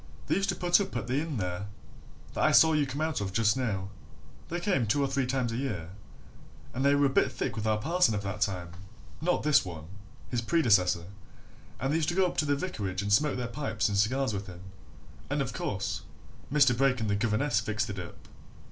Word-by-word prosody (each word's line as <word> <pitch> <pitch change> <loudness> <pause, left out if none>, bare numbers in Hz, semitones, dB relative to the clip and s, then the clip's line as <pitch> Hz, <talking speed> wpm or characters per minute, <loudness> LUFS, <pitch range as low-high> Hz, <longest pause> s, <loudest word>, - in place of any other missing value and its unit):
They - - 0
used 195 0 +1
to - - +1
put 175 +2 +3
up 195 - -4
at 120 - -3
the 130 +4 0
inn 160 -4 -4
there 90 0 -3 0.7
that - - -1
I - - +5
saw 160 0 +7
you 150 -2 +2
come 135 +3 -4
out 155 -7 -1
of 95 -1 -3
just 110 -1 +3
now. 100 -7 -2 0.6
They 175 - -2
came 175 - +1
two 140 +7 +2
or - - +1
three 135 -1 -1
times 130 -2 0
a 115 - -3
year 105 -11 -4 0.8
and 130 - -2
they 140 +1 +4
were 145 0 +3
a - - +4
bit 135 - +2
thick - - -3
with 110 -1 -3
our 110 -1 +2
parson 160 -1 +2
of 100 - -3
that 100 +1 -5
time 90 -4 -1 0.5
not 180 +2 +1
this 150 -1 +4
one: 80 -4 -7 0.5
his 120 -2 0
predecessor 105 - +3 0.7
and 135 +3 -1
they - - +3
used 160 -1 0
to 175 - -2
go 190 0 +4
up 180 - -3
to 155 - +2
the 145 -1 +2
vicarage 100 - -3
and 100 0 +1
smoke 150 +6 +3
their 125 - -2
pipes 115 -3 -1
and 100 - -1
cigars 130 +3 +1
with 100 0 -4
him 90 -1 -10 0.7
and - - -1
of - - -2
course, - - -3 0.5
Mr. 140 -4 +5
Brake 130 0 +2
and 110 - -1
the 100 - +1
governess 115 +6 +1
fixed 105 +2 -2
it 100 - -6
up. 90 - -10
125 Hz, 230 wpm, -29 LUFS, 100-145 Hz, 0.8 s, saw